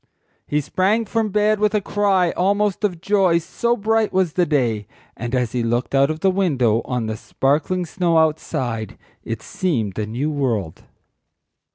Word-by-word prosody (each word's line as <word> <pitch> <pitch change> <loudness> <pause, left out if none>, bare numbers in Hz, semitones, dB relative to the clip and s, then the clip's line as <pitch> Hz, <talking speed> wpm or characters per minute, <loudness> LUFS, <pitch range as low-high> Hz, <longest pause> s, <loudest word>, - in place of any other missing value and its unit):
He 150 +1 0
sprang 200 +9 +1
from 225 0 -1
bed 210 +1 +2
with 210 0 +2
a - - +4
cry 195 -3 +1
almost 200 +2 0
of 180 -5 -1
joy 195 -4 +3
so 235 +8 -1
bright 220 +1 +1
was 185 -4 +1
the 180 -2 +1
day; 115 -8 0 0.3
and 120 +2 -3
as 125 -3 0
he 125 - -1
looked 120 +3 -1
out 135 +1 +4
of 155 +1 -4
the 190 - +3
window 130 - +1
on 125 -3 -2
the 110 0 -3
sparkling 155 +10 0
snow 170 0 0
outside 135 -8 -1 0.3
it - - -5
seemed 115 - -2
a 105 - -2
new 130 +8 -2
world. 115 - -2
165 Hz, 170 wpm, -21 LUFS, 125-195 Hz, 0.3 s, a